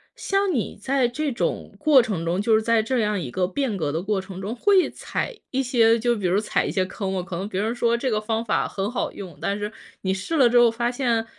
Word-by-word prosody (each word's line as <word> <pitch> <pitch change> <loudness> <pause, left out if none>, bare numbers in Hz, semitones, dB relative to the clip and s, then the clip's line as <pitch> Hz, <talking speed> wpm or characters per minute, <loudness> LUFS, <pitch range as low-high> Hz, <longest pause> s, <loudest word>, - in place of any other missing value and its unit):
像 390 0 0
你 245 - -2
在 265 +1 +2
这 285 +4 -2
种 235 - -3
过 295 -4 +6
程 200 -8 -3
中， 175 +3 0
就 220 +1 +3
是 220 - +2
在 230 0 +3
这 245 +3 -1
样 210 -3 0
一 140 - -5
个 180 +7 0
变 250 -1 -2
革 155 -5 -1
的 160 +3 -2
过 200 +1 -1
程 190 -1 -8
中， 205 +5 -4
会 390 - +3
踩 - - -4
一 265 - +1
些 235 -3 +3
就 240 +2 +1
是 - - -3
比 200 - -4
如 180 +3 +3
踩 215 - 0
一 - - -2
些 190 - +1
坑 190 0 -4
吗。 185 - -1
可 180 -1 -6
能 190 +3 -3
别 195 -2 -2
人 225 +3 -1
说 235 -1 +2
这 255 +2 -1
个 215 -3 +1
方 220 +1 -2
法 230 - 0
很 195 +1 -3
好 245 - -2
用， 180 -7 -9
但 200 +4 -2
是 210 +1 -3 0.3
你 190 - -1
试 195 - -3
了 265 -6 +5
之 240 +1 +5
后 240 -1 +6
发 235 +1 -1
现， 240 -3 0
225 Hz, 290 characters per minute, -24 LUFS, 195-245 Hz, 0.3 s, 过